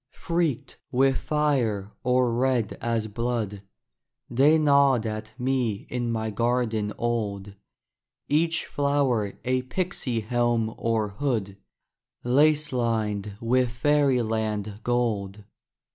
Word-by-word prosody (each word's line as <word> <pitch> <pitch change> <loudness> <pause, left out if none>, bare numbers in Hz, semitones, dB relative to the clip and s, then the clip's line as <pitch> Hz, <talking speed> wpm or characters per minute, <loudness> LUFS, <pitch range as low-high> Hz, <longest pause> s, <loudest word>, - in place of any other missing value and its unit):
Freaked 165 -6 -2
with 135 0 +3
fire 125 -10 0
or 125 -1 +2
red 125 -3 +1
as 115 -2 -1
blood, 110 -2 -3 0.7
They 140 +6 +5
nod 140 -5 +4
at 110 0 -6
me 125 -5 -1
in 120 -1 -1
my 110 -1 -2
garden 115 -1 0
old, 105 -4 -2 0.7
Each 165 +2 +2
flower 140 -8 0
a 130 0 +1
pixy 130 -5 -2
helm 120 -1 0
or 110 -2 0
hood, 100 -3 -2 0.7
Lace 150 +3 +3
lined 105 -4 -1
with 125 +2 +2
fairyland 115 -7 0
gold. 110 -5 -1
120 Hz, 100 wpm, -26 LUFS, 110-135 Hz, 0.7 s, They